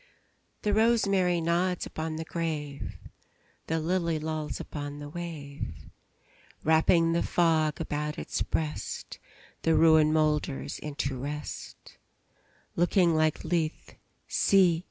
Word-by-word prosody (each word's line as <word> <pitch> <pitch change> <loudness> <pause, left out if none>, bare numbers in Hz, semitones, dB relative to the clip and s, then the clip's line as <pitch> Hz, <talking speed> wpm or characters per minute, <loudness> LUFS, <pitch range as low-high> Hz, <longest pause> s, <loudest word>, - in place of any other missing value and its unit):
The 210 - +1
rosemary 200 -5 +3
nods 175 +2 +1
upon 160 0 -4
the 160 +1 -4
grave; 155 -4 -4 0.7
The 160 0 0
lily 170 0 0
lolls 155 0 -3
upon 145 -1 -6
the 145 0 -7
wave; 145 - -6 0.9
Wrapping 165 +1 +4
the 170 - +2
fog 160 -3 +2
about 150 -1 -3
its - - -3
breast, 155 -1 -3 0.4
The 165 -1 +3
ruin 160 -1 +6
moulders 150 -3 0
into 140 -2 -3
rest; 150 +3 -7 0.8
Looking 175 0 +3
like 155 -1 +1
Lethe, 165 -2 -2 0.3
see! 180 -4 +4
160 Hz, 110 wpm, -28 LUFS, 150-170 Hz, 0.9 s, ruin